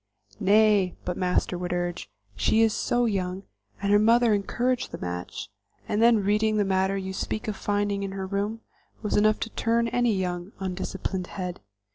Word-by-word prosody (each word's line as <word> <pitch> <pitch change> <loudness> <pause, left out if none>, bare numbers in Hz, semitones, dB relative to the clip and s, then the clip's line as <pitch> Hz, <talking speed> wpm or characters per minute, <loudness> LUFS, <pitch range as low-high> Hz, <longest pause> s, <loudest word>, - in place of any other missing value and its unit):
"Nay," 205 -2 +4
but 180 - -2
Master 180 -1 0
would 180 -1 -3
urge, 175 0 -2 0.3
"she 220 - +3
is 220 -2 +3
so 240 0 +1
young, 190 -3 -2 0.3
her 200 +1 +3
mother 230 +1 +4
encouraged 245 +5 0
the - - -5
match, 90 0 -5 0.4
and 210 - 0
then 235 0 +6
the 215 - +1
reading 215 +2 +2
matter 190 +1 +1
you 190 0 -4
speak 215 +4 -3
of 215 - -2
finding 205 0 -1
in 195 -1 -4
her 195 -1 -4
room, 205 +3 -2 0.4
was 210 - 0
enough 215 +1 +3
to 225 - -3
turn 230 +1 +1
any 240 -2 +2
young, 180 0 -3
undisciplined 190 0 -3
head. 180 -2 -5
200 Hz, 170 wpm, -26 LUFS, 185-220 Hz, 0.4 s, then